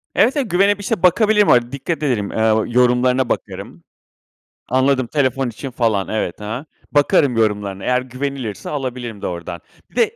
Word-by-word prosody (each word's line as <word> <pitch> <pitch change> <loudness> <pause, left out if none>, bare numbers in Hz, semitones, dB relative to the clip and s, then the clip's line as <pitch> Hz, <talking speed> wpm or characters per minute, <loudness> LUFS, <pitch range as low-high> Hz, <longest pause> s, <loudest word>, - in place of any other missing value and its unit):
Evet, 260 +6 +3
evet, 255 -9 -1
güvenip 200 +3 +3
işte 195 -2 -2
bakabilirim, 210 +3 +4
hani, 120 0 +4
dikkat 150 +4 -3
ederim, 115 -8 0
eee, 110 0 +2
o 110 0 +2
yorumlarına 125 +1 +2
bakarım. - - -5 0.9
Anladım. 130 0 +2
Telefon 135 -2 0
için 130 +4 -7
falan. 110 -6 0
Evet. 110 -4 -3
Hı 105 - -8
hı. 140 - -10 0.3
Bakarım 145 -3 +3
yorumlarına 105 -3 -1
eğer 125 0 +1
güvenilirse 130 -4 -5
alabilirim 125 -6 -5
de - - -3
ordan. 85 0 -6 0.3
Bir - - -25
de 465 -1 +2
125 Hz, 165 wpm, -19 LUFS, 110-145 Hz, 0.9 s, bakabilirim